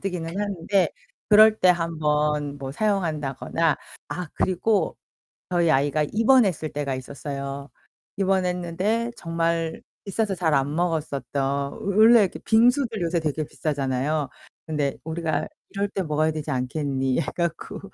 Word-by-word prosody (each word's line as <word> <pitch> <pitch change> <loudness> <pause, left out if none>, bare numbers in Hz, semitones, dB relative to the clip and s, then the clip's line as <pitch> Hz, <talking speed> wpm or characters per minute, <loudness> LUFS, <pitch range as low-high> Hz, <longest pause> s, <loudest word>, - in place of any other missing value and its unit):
뜨기는 180 -4 -3
하는데 200 -1 +1 0.4
그럴 215 +1 +7
때 185 - +5
1 165 -2 -1
번 150 -1 0
뭐 135 -1 -5
사용한다거나 165 - 0 0.3
아 160 +3 -4
그리고 195 +3 +1 0.5
저희 170 -2 +2
아이가 145 +2 +2
입원했을 220 - +3
때가 140 -2 -2
있었어요. 140 +1 -6 0.5
입원했는데 190 +4 0
정말 165 -1 -1 0.2
비싸서 205 -1 -1
잘 165 -3 +1
안 140 +1 +1
먹었었던 155 -5 -1 0.3
워 - - -11
원래 220 +4 +6
이렇게 195 - -1
빙수들 235 -1 +3
요새 170 0 +1
되게 155 -1 -2
비싸잖아요. 140 0 -1 0.4
근데' 145 -3 -1
우리가 160 -2 -2 0.2
이럴 200 +1 -1
때 195 - -3
먹어야 155 0 +1
되지 155 -1 -4
않겠니.' 135 0 -1
해 - - -3
갖고 170 -2 -3
165 Hz, 300 characters per minute, -24 LUFS, 145-195 Hz, 0.5 s, 그럴